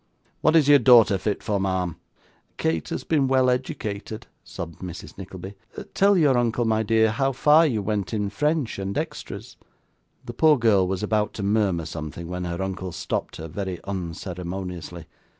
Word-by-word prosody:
What 155 - +3
is 155 -4 +5
your 145 -1 +7
daughter 115 -6 +6
fit 105 +1 -2
for, 105 -2 0
ma'am?' 95 -3 -1 0.6
'Kate 80 -1 -1
has - - -4
been 145 -4 +1
well 130 -1 +3
educated,' 110 -3 -4 0.2
sobbed 85 -1 -8
Mrs. 90 -2 -8
Nickleby. 95 0 -8 0.4
'Tell 200 0 +4
your 140 -7 +4
uncle, 120 0 0
my 110 -1 +2
dear, 110 0 +3
how 135 +5 +1
far 150 +5 +5
you 110 -7 -1
went 100 -2 -2
in 105 -3 -2
French 150 +1 -1
and 100 0 -3
extras.' - - -6 0.7
The 120 - -6
poor 155 +3 +5
girl 105 -6 +3
was 95 +1 -2
about 105 0 0
to 100 - -5
murmur 100 -5 +1
something, 80 +1 -6
when 90 +1 -4
her 85 +2 -3
uncle 95 -1 -4
stopped - - -3
her, 80 - -7
very 95 +1 -4
unceremoniously. 90 -1 -6
100 Hz, 170 wpm, -24 LUFS, 90-120 Hz, 0.7 s, your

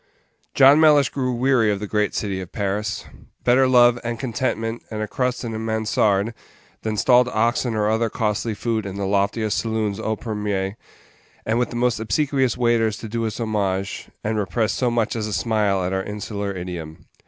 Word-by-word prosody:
John 135 +3 +7
Mellish 150 -4 +5
grew 130 -2 -2
weary 125 -2 +2
of 100 - -2
the 105 - -4
great 105 0 0
City 95 -3 -2
of 90 0 -9
Paris. 105 0 -2 0.4
Better 130 +2 +4
love, 120 -1 +5
and 120 -1 -3
contentment, 115 -2 -2
and 110 - -5
a 110 - -2
crust 125 +1 -2
in 115 -2 -4
a 110 - -4
mansarde, 110 -1 +1 0.5
than 110 -1 -2
stalled 125 +3 +5
oxen 120 +1 0
or 105 -1 +1
other 110 +1 +1
costly 110 0 -1
food 110 -1 -2
in 95 - -6
the 100 0 -2
loftiest 100 +2 0
saloons 110 -2 -2
au 110 0 -1
premier, 105 -3 -3 0.7
and 115 +2 +1
with 125 - 0
the - - -8
most 120 -1 +1
obsequious 130 +3 0
waiters 115 -3 +2
to 110 - -7
do 115 +1 -2
us 110 - -5
homage, 100 -4 -2 0.2
and 110 0 -1
repress 110 +2 0
so 125 - 0
much 120 -1 0
as 110 -2 -2
a 105 - -4
smile 105 -5 +1
at 90 +1 -2
our 95 - 0
insular 105 0 -4
idiom. 90 -4 -7
110 Hz, 190 wpm, -22 LUFS, 105-120 Hz, 0.7 s, John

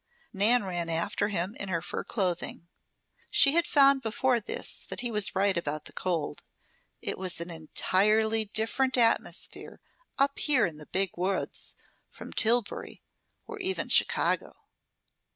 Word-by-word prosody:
Nan 215 +4 +3
ran 175 -3 -3
after 170 +5 -1
him 195 +1 -2
in 195 - -4
her 170 -2 -2
fur - - -4
clothing. 180 -4 -3 0.6
She 280 - +5
had 340 +2 +2
found 275 -2 +5
before 240 +2 +1
this 215 - -2
that - - -3
he 240 -1 -2
was 210 -3 +2
right 195 0 +2
about 155 -3 -3
the - - -11
cold. 170 -5 -3 0.6
It - - -3
was 185 -3 -1
an 170 +1 -5
entirely 215 +7 +1
different 230 +5 0
atmosphere 230 -2 0 0.4
up 275 +1 +1
here 290 -4 +3
in 160 -3 -5
the 150 - -11
Big 190 -1 0
Woods 185 +2 -3 0.3
from - - -11
Tillbury, 230 -1 0 0.4
or 435 -2 -8
even 380 0 -1
Chicago. - - +2
205 Hz, 145 wpm, -28 LUFS, 180-245 Hz, 0.6 s, She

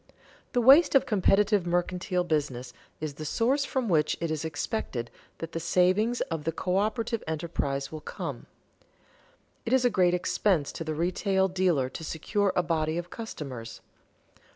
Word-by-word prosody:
_The 245 - +3
waste 280 +6 +7
of 270 - +5
competitive 205 -3 +3
mercantile 180 +1 0
business 140 -7 -2 0.3
is 155 -2 -4
the 155 - -8
source 260 - +1
from 260 -4 -1
which 155 -5 +2
it 165 -1 -2
is 155 -1 -2
expected 145 - -3 0.3
that 165 0 -6
the 165 - -3
savings 185 +8 +2
of 165 -2 -3
the 165 - 0
coöperative 215 +7 -1
enterprise 150 -4 -2
will 155 -1 -7
come._ - - -6 1.2
It 235 - -2
is 260 -1 +4
a 245 - +4
great 180 -3 +3
expense 180 -3 +1
to - - -6
the 155 -1 -3
retail 190 +3 +1
dealer 180 -8 +1
to 160 - -8
secure 195 +6 0
a 180 - +2
body 160 -1 0
of 175 0 -5
customers. 140 - -7
175 Hz, 155 wpm, -28 LUFS, 155-210 Hz, 1.2 s, waste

